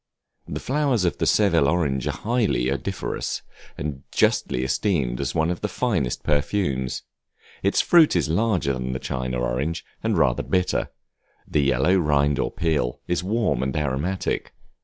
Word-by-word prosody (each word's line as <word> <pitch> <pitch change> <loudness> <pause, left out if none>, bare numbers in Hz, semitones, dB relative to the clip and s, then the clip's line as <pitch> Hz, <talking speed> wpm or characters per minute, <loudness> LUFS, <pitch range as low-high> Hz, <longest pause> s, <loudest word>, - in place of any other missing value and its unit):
The - - -4
flowers 135 -7 +1
of 85 - -1
the - - +1
Seville 70 - +4
orange 70 -7 0
are - - +1
highly 105 - +1
odoriferous, 70 -2 -3 0.3
and 70 -2 -4
justly 60 - +1
esteemed 65 - 0 0.2
one 80 +1 +2
of 90 - -4
the 105 - 0
finest 95 - -1
perfumes. 70 -4 0 0.6
Its - - +3
fruit 165 - +5
is 85 - +2
larger 90 -4 +1
than 65 0 -3
the - - -1
China 65 -1 -3
orange, 65 +7 -2 0.2
and - - 0
rather - - +3
bitter; 90 0 0 0.6
the 75 - +1
yellow 70 +6 +3
rind 75 -4 +2
or - - +1
peel 75 -8 -1
is 90 0 0
warm 105 - 0
and 65 +1 -1
aromatic. 75 +6 -2
75 Hz, 150 wpm, -24 LUFS, 65-95 Hz, 0.6 s, fruit